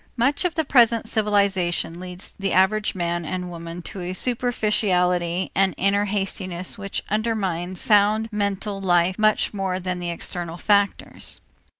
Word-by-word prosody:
Much 270 +5 +2
of 360 -2 -1
the 320 -2 0
present 235 -4 +4
civilization 200 -6 +1
leads 180 +1 -8
the 195 -1 -1
average 200 +3 +2
man 175 -1 -1
and 180 +2 -4
woman 170 0 -7
to 190 - -6
a 180 +1 -4
superficiality 185 -7 0
and 195 -1 +2
inner 200 +2 +2
hastiness 190 -3 -3
which 200 -1 -4
undermines 190 -5 -1
sound 215 +1 +3
mental 200 -1 -2
life 180 +1 +2
much 215 0 +3
more 190 -2 -2
than 180 -1 -3
the 175 -1 -3
external 170 0 -4
factors. 200 +1 0
195 Hz, 140 wpm, -23 LUFS, 180-210 Hz, -, present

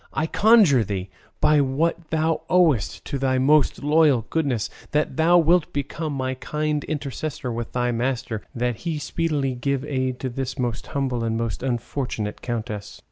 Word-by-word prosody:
I 155 - 0
conjure 200 - +5
thee, 95 -2 -4 0.3
by 150 -1 +4
what 155 +4 -1
thou 160 0 +1
owest 165 - +2
to 140 - -3
thy 130 -1 +1
most 145 +3 +3
loyal 150 -6 +4
goodness, 140 -9 0 0.3
that 150 +1 +1
thou 165 +2 +5
wilt 170 0 +3
become 145 +3 -3
my 130 -1 -2
kind 150 +3 -2
intercessor 145 -3 -4
with 115 0 -5
thy 125 0 +1
master, 120 -2 -2
that 120 -1 -1
he 165 +2 -3
speedily 145 -2 -1
give 135 +2 -2
aid 130 -3 -2
to 130 - -2
this 130 +2 -4
most 120 -3 -2
humble 130 -4 -1
and 115 0 -1
most 115 -1 -3
unfortunate 120 -3 -3
countess." 110 -4 -5
135 Hz, 160 wpm, -23 LUFS, 120-155 Hz, 0.3 s, conjure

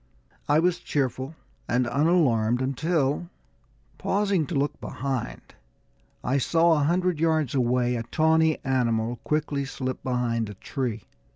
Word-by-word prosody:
I 145 - +5
was 175 +2 +2
cheerful 135 +1 -2 0.3
and 125 +1 +2
unalarmed 125 -6 +2
until, 145 +4 0 0.7
pausing 195 -6 +1
to 170 - -4
look 140 +1 -1
behind, 130 - -4 0.7
I 135 +3 +1
saw, 165 +5 +3
a 150 -2 +2
hundred 180 0 +1
yards 160 -4 +1
away, 125 -1 +1
a 115 - -2
tawny 160 +5 +2
animal 120 -3 0
quickly 150 +2 -1
slip 130 -1 -4
behind 120 -3 -1
a 105 - -8
tree. 115 -1 -4
135 Hz, 125 wpm, -26 LUFS, 125-160 Hz, 0.7 s, I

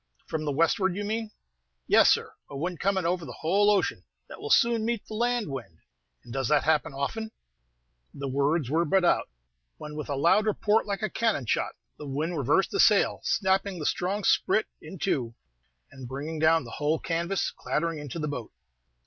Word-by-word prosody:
"From 155 -1 -3
the 145 - 0
westward, 170 +5 +2
you 205 - -3
mean?" 220 +1 -2 0.6
"Yes, - - +6
sir, - - +1 0.2
a 140 - -7
wind 175 +3 -3
coming 190 -2 0
over 175 0 0
the 125 - -9
whole 200 +6 +3
ocean, 205 -2 +1 0.2
that - - -11
will 435 - -5
soon 235 - +4
meet 230 -1 -2
the - - -9
land 240 -1 0
wind." 125 - -7 0.5
"And 120 - -10
does 135 -2 -1
that 150 0 +2
often 155 -2 +2
happen?" 220 +12 -3 0.8
The 140 0 -6
words 140 +2 +1
were 160 +6 +2
but 180 +3 +2
out, - - +2 0.5
when, 150 0 -8
with 150 -1 -6
a 140 - -1
loud 185 +9 +3
report 215 +1 +2
like 200 +1 -3
a 215 - 0
cannon 220 - 0
shot, - - 0 0.3
the 150 - -7
wind 155 +6 -2
reversed 145 +6 +2
the 400 - -2
sail, - - +4
snapping 190 -1 +1
the 155 - -5
strong 195 +7 -1
sprit 215 - +3 0.2
in 190 - -9
two, 120 -6 -1 0.6
and 130 -2 -9
bringing 145 +5 -5
down 160 +1 +4
the - - -10
whole 150 +2 0
canvas 170 +4 -1
clattering 165 0 -2
into 145 +2 -6
the 150 -2 -2
boat. 125 -6 -5
165 Hz, 190 wpm, -27 LUFS, 145-200 Hz, 0.8 s, Yes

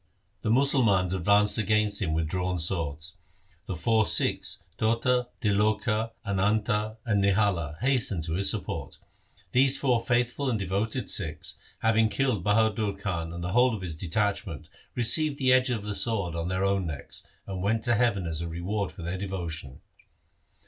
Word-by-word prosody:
The - - -2
Musalmans 115 -8 +3
advanced 100 +4 +3
against 105 -1 +1
him 85 -5 -1
with 80 0 0
drawn 90 +2 -1
swords. 85 0 -2 0.5
The 95 - -3
four 110 +6 +2
Sikhs - - +2 0.2
Tota, 120 +3 +1 0.2
Tiloka, 105 +2 +1 0.2
Ananta, 105 +2 0
and 105 -4 +1
Nihala 95 -6 +1
hastened 125 -10 +1
to 80 0 -3
his 95 +3 +3
support. - - -3 0.5
These 135 +2 +4
four 125 -4 +1
faith 120 0 +1
ful 140 +2 -3
and 115 - 0
devoted 105 +5 -2
Sikhs, 80 -1 0 0.2
having 110 0 +3
killed 125 -7 0
Bahadur 105 0 +2
Khan 90 -4 -4
and 85 0 -6
the 90 - -3
whole 125 +2 +3
of 100 - -7
his 85 -4 -4
detachment, 100 - -3 0.2
received 140 +5 +3
the 130 -2 +3
edge 130 0 +4
of 115 -4 -2
the 105 0 -3
sword 100 -6 0
on 85 0 -3
their 95 +1 0
own 100 -2 0
necks, 75 -4 -6 0.2
and 95 -2 -5
went 110 +3 0
to 120 - +2
heaven 110 -5 +1
as 80 -1 -2
a 85 - -3
reward 90 +3 -3
for 80 - -10
their 90 +2 -4
devotion. 85 -8 -5
100 Hz, 165 wpm, -27 LUFS, 90-115 Hz, 0.5 s, These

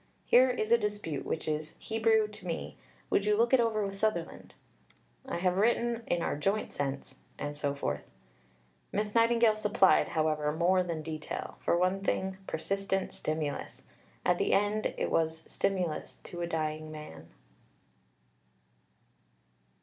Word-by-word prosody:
"Here 255 +2 +6
is 230 -3 -1
a 235 - +6
dispute 205 -9 -3
which - - -2
is 155 0 -2
Hebrew 220 -1 +2
to 210 -3 -11
me; 165 - -4 0.4
would 200 - +3
you 210 0 +2
look 235 +3 +3
it 260 - +7
over 225 -2 +2
with 195 - -4
Sutherland?" 195 -4 -2 0.7
"I 265 - -2
have 180 +1 +1
written 235 +2 +2
in 175 -1 0
our - - 0
joint 195 +8 -1
sense," 140 -1 -4 0.2
and 145 0 -4
so 145 -1 -1
forth. 75 - -2 0.9
Miss 210 0 -1
Nightingale 230 -1 +4
supplied, 210 -3 +4
however, 155 -2 +1
more 180 +3 +3
than 170 -3 -3
detail 155 -1 -5
for 170 - +1
one 185 +2 +2
thing, 190 -1 -1
persistent 195 +4 -1
stimulus. 155 -2 -3 0.4
At - - +3
the - - +2
end 205 +2 +2
it - - -1
was 160 0 +1
stimulus 180 -5 -2
to 175 - -7
a 170 - -1
dying 155 -1 -2
man. 85 - -9
185 Hz, 145 wpm, -31 LUFS, 155-215 Hz, 0.9 s, it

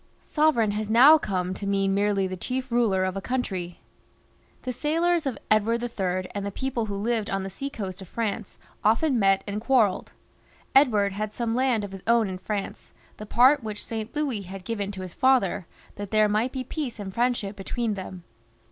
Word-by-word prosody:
Sovereign 295 -9 +2
has 210 +1 -3
now 270 +8 +8
come 185 -6 -2
to 200 +1 -6
mean 195 -1 +1
merely 200 -1 +1
the 185 0 -3
chief 255 +7 -4
ruler 215 -6 +2
of 185 0 -2
a 195 - -3
country. 190 -8 -3 0.8
The 255 - -3
sailors 330 +4 +1
of 260 - -2
Edward 225 +2 +2
III. 185 -6 -2
and 205 - -3
the 200 - -2
people 240 +1 -3
who 200 - -4
lived 220 +1 -1
on 195 0 -1
the 195 - -5
sea 275 +9 -5
coast 195 -7 -6
of 190 - -9
France 220 -1 -4 0.3
often 240 +5 +3
met 195 -1 +3
and 205 +1 -4
quarrelled. 230 -6 +2 0.6
Edward 215 -8 +4
had 210 +1 -4
some 235 -2 -1
land 250 -3 +1
of 200 - -6
his 195 -1 -8
own 230 -2 +4
in 185 -1 -5
France, 205 0 -5 0.2
the 215 - -8
part 255 +5 +5
which 215 -1 -6
St. 225 +2 -5
Louis 280 -8 -1
had 190 0 -9
given 205 -3 -3
to 190 -2 -6
his 180 -2 -8
father, 250 -9 +2 0.3
that 205 -1 -5
there 215 0 +4
might 215 +5 +1
be 260 -1 -4
peace 260 -2 -4
and 195 -3 -6
friendship 235 -4 0
between 215 +3 -2
them. 185 -2 -7
215 Hz, 195 wpm, -26 LUFS, 195-245 Hz, 0.8 s, now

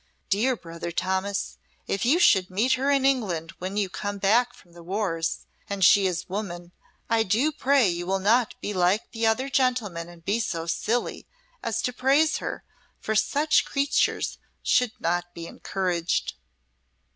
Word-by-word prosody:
Dere 240 +6 +2
brother 170 -3 -7
Thomas, 190 +3 -2 0.3
if 200 +4 -1
you 280 +8 +4
should 195 - +4
meet 215 +8 +2
her 270 +2 0
in 275 -1 +3
England 190 -12 0
when 190 +3 -4
you 205 -2 +1
come 205 +2 -4
back 225 +5 +3
from 175 - -21
the 170 0 -13
wars, 170 -2 -2 0.2
and 200 -2 +2
she 195 +1 +6
is 180 -1 -2
a - - -30
woman, 175 -3 -5 0.4
I 230 -1 +2
do 225 +9 +2
pray 275 -5 +3
you 175 0 -2
will 195 +1 +1
not 220 +5 +2
be 210 - -3
like 185 +3 +1
the 225 -1 0
other 250 +5 +1
gentlemen 240 -11 0
and 170 -1 -15
be 210 +4 +1
so 170 -7 -2
silly 220 +8 -2 0.3
as 225 -2 -2
to 250 - -1
praise 280 +6 +3
her, - - -5 0.4
for 220 - -2
such 290 +8 +3
creatures 280 0 0 0.2
should 250 -3 +2
not 175 +1 -2
be 170 - -7
encorragd." 180 -3 -2
200 Hz, 170 wpm, -25 LUFS, 175-245 Hz, 0.4 s, she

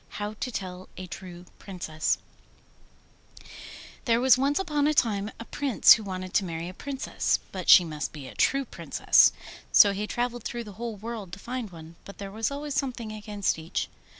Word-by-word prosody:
HOW 210 0 -3
TO 250 - -3
TELL 185 -3 -6
A 185 - -6
TRUE 180 0 -9
PRINCESS 165 -5 -2 1.9
There 230 -1 +3
was 260 +1 +6
once 275 +3 +1
upon 300 -6 +1
a 305 - +1
time 210 -5 +1
a 230 - -7
Prince 275 -3 +5
who 220 - -1
wanted 185 -2 -6
to 200 - +3
marry 165 -2 -4
a 180 - -7
Princess, 275 +6 -1
but 185 -2 -5
she 180 - +10
must 150 -3 -4
be 145 -4 -9
a 125 - -10
true 275 - +2
Princess. - - +4 0.4
So 200 -1 +7
he 205 +2 -3
travelled 240 0 -2
through 240 -1 -4
the 210 - -10
whole 235 -2 -3
world 215 -2 -7
to - - -5
find 240 +1 -5
one, 165 -1 -12
but 200 - -11
there 200 -1 -7
was 220 +1 -1
always 285 +1 -5
something 250 -5 -2
against 210 -4 -2
each. 160 +1 -3
210 Hz, 185 wpm, -27 LUFS, 185-245 Hz, 1.9 s, she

